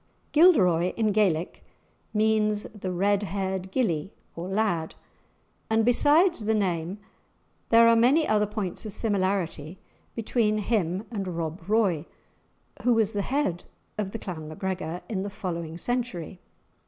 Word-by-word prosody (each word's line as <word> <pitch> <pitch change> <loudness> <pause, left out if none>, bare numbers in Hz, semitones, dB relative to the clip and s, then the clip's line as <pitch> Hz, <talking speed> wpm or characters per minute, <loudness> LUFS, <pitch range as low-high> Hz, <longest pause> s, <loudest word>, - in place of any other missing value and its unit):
Gilderoy, 185 - +5
in 220 -2 +2
Gaelic, 185 -5 0 0.5
means 215 -1 +2
the 190 -3 -5
red 200 +3 +1
haired 190 -2 -3
gillie 190 - 0 0.2
or 170 +2 -5
lad, 190 -5 -1 0.7
and 220 0 +2
besides 295 - +4
the 220 +1 +2
name 180 -2 -1 0.7
there 230 0 +7
are 230 - +6
many 265 +8 +4
other 210 -1 +2
points 210 -3 -4
of 215 -3 -5
similarity 190 -6 -1 0.4
between 220 -1 +1
him 195 -2 -1
and 200 -4 -3
Rob 165 -1 -4
Roy, 195 -8 +2 0.7
who 245 -1 +3
was 220 -1 +1
the 205 - 0
head 225 -8 -1 0.3
of 210 -3 -2
the 225 - -5
Clan 165 -7 -7
MacGregor 175 +1 -4
in 200 -4 -2
the 200 - -3
following 170 -4 -5
century. 200 -6 -3
200 Hz, 135 wpm, -26 LUFS, 180-220 Hz, 0.7 s, there